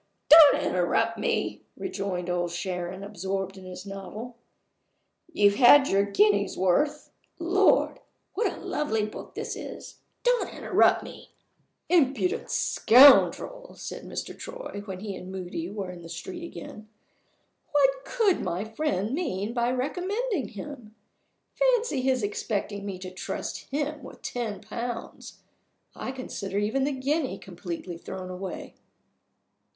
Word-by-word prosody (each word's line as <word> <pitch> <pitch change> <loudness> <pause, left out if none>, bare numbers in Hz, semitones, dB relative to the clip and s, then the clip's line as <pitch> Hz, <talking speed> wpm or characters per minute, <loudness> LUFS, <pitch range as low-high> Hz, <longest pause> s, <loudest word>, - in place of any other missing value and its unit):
"Don't 310 -1 +9
interrupt - - +1
me!" - - -1 0.2
rejoined 195 - -3
Old 175 -1 0
Sharon, 180 +1 -4
absorbed 195 -1 -4
in 190 -1 -11
his 185 +1 -8
novel. 200 +5 -7 1.0
"You've 205 -8 +4
had 275 +2 +8
your 195 - +4
guinea's 205 0 +2
worth. 290 +12 +1 0.3
Lord! 370 +3 +3 0.3
what 445 - 0
a - - -9
lovely 220 -8 -1
book 215 - -9
this - - -4
is! - - -9 0.2
Don't - - +2
interrupt - - +3
me!" - - -11 0.6
"Impudent 360 - +2
scoundrel!" 290 - +5
said - - -7
Mr. - - -6
Troy, - - -7
when 190 -2 -6
he 200 -2 -5
and 185 0 -8
Moody 180 -2 -5
were 200 -2 -5
in 175 -1 -10
the 165 - -11
street 345 - -7
again. 280 -10 -9 0.8
"What - - +3
could 445 -7 +1
my 180 +5 -2
friend 220 -3 -1
mean 225 - -2
by 240 0 +1
recommending 360 - -1
him? 225 -1 -9 0.6
Fancy 485 - +2
his 255 -2 +1
expecting 205 0 -3
me 195 -2 -4
to 185 0 -8
trust 185 - -5
him 295 +1 -2
with 260 - -12
ten 240 -6 -4
pounds! 235 +2 -6 0.5
I - - -4
consider 200 -7 -5
even 220 +7 +1
the 290 - 0
guinea 275 +2 -1
completely 175 -2 -7
thrown 185 +1 -7
away." 185 +1 -6
220 Hz, 130 wpm, -27 LUFS, 190-295 Hz, 1.0 s, Don't